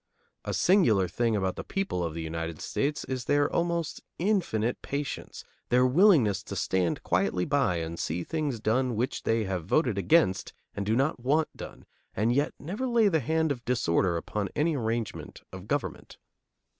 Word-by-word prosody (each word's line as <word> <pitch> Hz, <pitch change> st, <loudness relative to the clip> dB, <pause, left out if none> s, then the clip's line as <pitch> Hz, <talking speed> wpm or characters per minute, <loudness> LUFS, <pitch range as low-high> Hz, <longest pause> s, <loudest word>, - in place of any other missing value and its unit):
A -, -, -3 dB
singular 115 Hz, -, +4 dB
thing 115 Hz, +5 st, 0 dB
about 95 Hz, -2 st, -1 dB
the -, -, -4 dB
people 195 Hz, -, -2 dB
of 80 Hz, -2 st, -3 dB
the 85 Hz, -, -4 dB
United 80 Hz, 0 st, -4 dB
States 145 Hz, +2 st, -2 dB
is 130 Hz, -2 st, -4 dB
their 145 Hz, 0 st, +3 dB
almost 170 Hz, -1 st, -1 dB, 0.2 s
infinite 165 Hz, -, 0 dB
patience, 140 Hz, 0 st, -5 dB, 0.3 s
their 125 Hz, +1 st, +4 dB
willingness 130 Hz, -, +4 dB
to 100 Hz, -, -6 dB
stand 90 Hz, -2 st, 0 dB
quietly 90 Hz, 0 st, +1 dB
by 140 Hz, -11 st, +1 dB
and 85 Hz, 0 st, -4 dB
see 85 Hz, +3 st, -2 dB
things 150 Hz, -, -2 dB
done 120 Hz, +3 st, +1 dB
which 125 Hz, +5 st, -1 dB
they 115 Hz, 0 st, +1 dB
have 95 Hz, -4 st, -3 dB
voted 120 Hz, -6 st, +2 dB
against 100 Hz, -, +2 dB, 0.2 s
and 100 Hz, -1 st, -4 dB
do 110 Hz, -, +2 dB
not 135 Hz, +2 st, +1 dB
want 150 Hz, +6 st, +1 dB
done, -, -, -10 dB, 0.3 s
and 110 Hz, +4 st, +2 dB
yet 145 Hz, +3 st, 0 dB
never 200 Hz, -, -4 dB
lay 230 Hz, -4 st, +4 dB
the 160 Hz, -4 st, +2 dB
hand 160 Hz, +3 st, 0 dB
of 125 Hz, -4 st, -4 dB
disorder 95 Hz, -8 st, +1 dB
upon 100 Hz, +4 st, -3 dB
any 155 Hz, +1 st, +1 dB
arrangement 115 Hz, -3 st, -3 dB
of 95 Hz, +2 st, -9 dB
government. 115 Hz, -, -3 dB
120 Hz, 170 wpm, -28 LUFS, 95-150 Hz, 0.3 s, singular